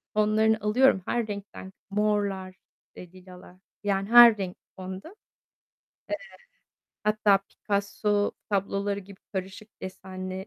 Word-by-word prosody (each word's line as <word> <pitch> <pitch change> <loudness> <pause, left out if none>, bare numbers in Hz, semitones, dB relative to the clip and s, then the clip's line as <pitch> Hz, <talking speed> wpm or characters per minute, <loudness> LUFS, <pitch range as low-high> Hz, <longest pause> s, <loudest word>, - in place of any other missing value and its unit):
tonlarını 215 +1 +3
alıyorum. 210 0 +4
Her 235 -2 -1
renkten 200 -2 -8 0.2
morlar, 200 -2 -1 0.4
eee, 180 -1 -11
lilalar. 180 -1 -14 0.3
Yani 195 0 -1
her 240 -2 +9
renk, 185 -3 -5 0.2
tonda. 190 - -7
Eee, - - -15 1.9
hatta 210 -2 +4
Picasso 205 +1 -1 0.2
tabloları 200 0 -1
gibi 195 0 -14
karışık 190 +2 -6
desenli 185 0 -7
200 Hz, 105 wpm, -27 LUFS, 190-210 Hz, 1.9 s, her